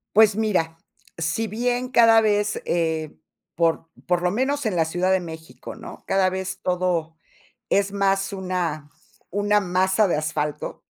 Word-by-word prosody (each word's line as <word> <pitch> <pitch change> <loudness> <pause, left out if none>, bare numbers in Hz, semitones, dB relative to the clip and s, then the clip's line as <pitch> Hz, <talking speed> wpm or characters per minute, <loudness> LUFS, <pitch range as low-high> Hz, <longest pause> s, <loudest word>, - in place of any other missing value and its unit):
Pues 215 -1 +6
mira, 185 -7 0 0.4
si 165 +7 -1
bien 245 +3 -1
cada 230 -3 +6
vez 210 -1 +1
eh, 160 -2 -1 0.4
por 165 0 +1 0.2
por 175 -1 +2
lo 180 0 +1
menos 265 +6 0
en 215 -4 0
la 165 -2 +2
Ciudad 175 +3 0
de 190 - +4
México, 160 -7 -9
¿no?, - - -11
cada 195 -1 +3
vez 190 0 -4
todo 175 -3 -1 0.5
es 200 0 +2
más 195 0 +1
una 180 -6 -3 0.4
una 205 +2 +2
masa 190 +2 +2
de 170 - +1
asfalto 150 -1 -3
185 Hz, 150 wpm, -23 LUFS, 165-210 Hz, 0.5 s, Pues